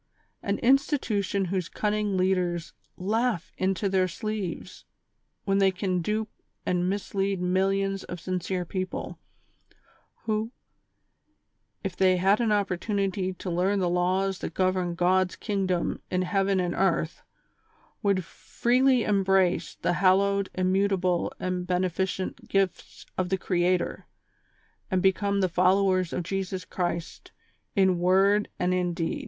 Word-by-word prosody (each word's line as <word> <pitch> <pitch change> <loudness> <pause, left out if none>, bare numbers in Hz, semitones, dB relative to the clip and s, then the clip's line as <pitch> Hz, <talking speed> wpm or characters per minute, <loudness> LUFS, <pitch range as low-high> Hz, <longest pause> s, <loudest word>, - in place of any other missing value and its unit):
An 200 0 -1
institution 230 -7 +1
whose 185 -3 -1
cunning 210 -2 -1
leaders 180 -2 0 0.2
laugh 215 0 -1
into 190 +2 0
their 190 -1 +2
sleeves 210 -1 -5 0.6
when 195 0 +1
they 195 -1 +5
can 185 -1 -1
dupe 215 +4 -2 0.3
and 180 0 +1
mislead 195 -1 -1
millions 195 +2 0
of 180 - -7
sincere 180 0 -2
people, 185 +2 -4 1.0
who, 220 +1 -1 1.3
if 195 -3 -3
they 185 -1 +4
had 195 +5 +3
an 225 -2 +1
opportunity 195 -1 0
to 185 0 -6
learn 185 +4 +1
the 185 -2 +1
laws 185 +2 +1
that - - -6
govern 185 -2 +1
God's 180 +1 +2
kingdom 190 -4 -1
in 185 0 0
heaven 195 +1 +1
and 175 -1 0
earth, 170 -3 0 0.8
w^ould 200 -2 +2
freely 250 +7 +1
embrace 195 -3 +2
the - - +2
hallowed, 195 +2 +3
immutable 185 -1 +1
and 180 -1 -2
beneficent 185 +1 -2
gifts 195 -2 -1
of 180 -1 0
the 190 - +1
Creator, 180 -1 0 0.8
and 185 -3 +1
become 200 +1 +2
the 185 - +3
followers 185 0 +2
of - - -2
Jesus 190 0 -3
Christ 175 -3 -4 0.4
in 190 -3 +3
word 195 +3 +3
and 180 0 +1
in 180 -1 0
deed. 165 -2 -2
190 Hz, 125 wpm, -27 LUFS, 180-200 Hz, 1.3 s, they